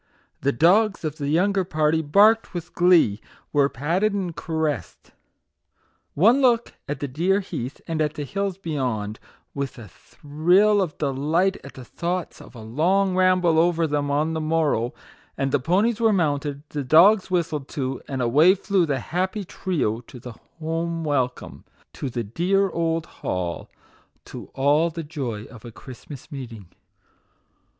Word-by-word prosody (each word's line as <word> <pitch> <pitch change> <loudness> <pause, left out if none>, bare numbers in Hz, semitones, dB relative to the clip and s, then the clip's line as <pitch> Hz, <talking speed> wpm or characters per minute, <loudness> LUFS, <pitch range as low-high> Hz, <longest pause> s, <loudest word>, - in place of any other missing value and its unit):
The 140 - +1
dogs 195 - +3
of 155 0 -3
the 140 -1 -3
younger 190 +5 +2
party 155 -2 +1
barked 205 +7 +3
with 175 0 -6
glee 170 - +4 0.3
were 140 -1 +3
patted 175 - 0
and 185 -5 -3
caressed. 155 - -3 1.0
One 230 - +4
look 240 -3 +2 0.2
at 145 -2 -4
the 145 - -2
dear 175 +9 +1
heath 140 -9 -6
and 160 -2 -2
at 150 0 -1
the 150 - -4
hills 195 +4 -3
beyond, 125 - -3 0.3
with 140 -1 -4
a 115 -3 -10
thrill 175 - +1
of 175 -6 -3
delight 155 +7 0
at 140 - -11
the 130 - -10
thoughts 175 +6 -4
of - - -15
a 115 - -9
long 180 - +1
ramble 185 -3 +3
over 170 0 +2
them 145 -2 -1
on 150 +3 0
the 160 - -2
morrow, 155 -7 0 0.5
and 135 0 -1
the - - +2
ponies 200 - +1
were 225 -1 +3
mounted, 145 -6 -1
the 145 -2 -4
dogs 185 +10 +5
whistled 160 -6 -1
to, 130 -3 -4
and 135 -2 -2
away 150 +11 +5
flew 195 -3 0
the 140 -2 0
happy 185 - -2
trio 165 - -2
to 125 +1 -13
the 120 0 -9 0.2
home 165 +1 -3
welcome, 130 -5 -2 0.3
to 135 - -5
the 120 -1 -3
dear 185 - 0
old 165 -1 -1
hall, 90 - -4 0.6
to - - -9
all 145 +5 +3
the 165 0 -6
joy 135 -9 -5
of 115 -4 -13
a 120 - -9
Christmas 130 +5 -12
meeting. 115 - -8
155 Hz, 160 wpm, -23 LUFS, 135-185 Hz, 1.0 s, dogs